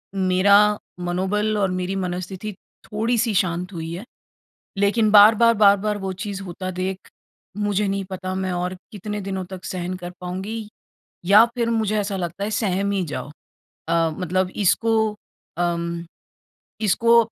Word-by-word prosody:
मेरा 200 +2 +4 0.2
मनोबल 190 +5 0
और 195 -2 +1
मेरी 185 +1 -2
मनोस्थिति 185 +2 -4 0.4
थोड़ी-सी 225 +1 +1
शांत 180 0 0
हुई 165 -1 -5
है, 185 +7 -7 0.7
लेकिन 210 +2 +3
बार-बार, 220 +3 +7
बार-बार 205 0 +4
वो 195 -1 -3
चीज़ 200 -2 -5
होता 185 0 -5
देख, 185 +1 -3 0.6
मुझे 205 0 0
नहीं 195 0 -1
पता 185 0 -4
मैं 190 -1 -2
और 180 +1 -2 0.2
कितने 210 0 -5
दिनों 190 -1 -4
तक 190 -1 -8
सहन 185 -1 -4
कर 175 -1 -7
पाऊँगी 195 +5 -5 0.6
या 205 +4 +8
फिर 235 -1 0
मुझे 215 -2 +1
ऐसा 200 -1 -2
लगता 180 +1 -3
है 210 - -2
सहम 200 -2 0
ही 195 -2 0
जाओ। 150 -2 -5 0.6
अ, 165 -1 +3
मतलब 185 +1 0 0.2
इसको 220 +2 +2 0.4
अम, 170 -1 -1 0.8
इसको 230 +3 +4
195 Hz, 140 wpm, -22 LUFS, 180-210 Hz, 0.8 s, या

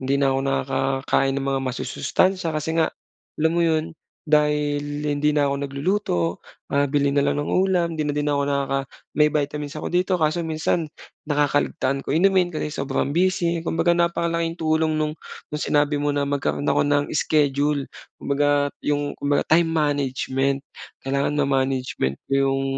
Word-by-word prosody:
hindi 135 +1 0
na 140 -1 +2
ako 135 - 0
nakakakain 135 0 0
ng 135 - -2
mga 135 -1 0
masusustansiya 185 +7 0
kasi 155 +1 -2
nga, 160 - +4 0.5
alam 160 +1 +2
mo 170 - +1
'yon 160 -1 +2 0.4
dahil 150 -1 +2 0.2
hindi 145 +1 +1
na 145 -1 +2
ako 140 - 0
nagluluto, 140 - -1 0.3
ah, 140 - +4
bili 140 -1 +1
na 140 - +3
lang 145 - 0
ng 145 - -2
ulam 180 -3 +1
'di 155 - -1
na 150 - -1
'din 145 0 -1
na 145 - +1
ako 140 - +1
nakaka 140 -1 0 0.4
may 150 0 +4
vitamins 150 0 -2
ako - - -5
dito 180 +1 +1
kaso 155 +2 +1
minsan, 160 0 -1 0.4
nakakaligtaan 145 -2 +1
ko - - -6
inumin 180 +3 +3
kasi 155 -2 -4
sobrang 140 +1 -1
busy 175 -2 +1
kumbaga 170 +1 +1
napakalaking 170 -1 0
tulong 160 -1 +1
no'ng 150 0 -1 0.4
nong 150 - -2
sinabi 145 0 +2
mo 145 0 0
na 145 0 0
magkaroon 140 0 -1
ako - - +3
ng 145 0 +2
schedule 145 -1 +1 0.3
kumbaga 145 0 +1 0.2
'yong 145 0 -1
kumbaga 145 0 0
time 165 +1 +3
management. 140 -3 0 0.5
Kailangan 140 +2 0
ma-management 130 - -1
ko - - -9
'yong 135 0 +2
145 Hz, 165 wpm, -23 LUFS, 140-160 Hz, 0.5 s, nga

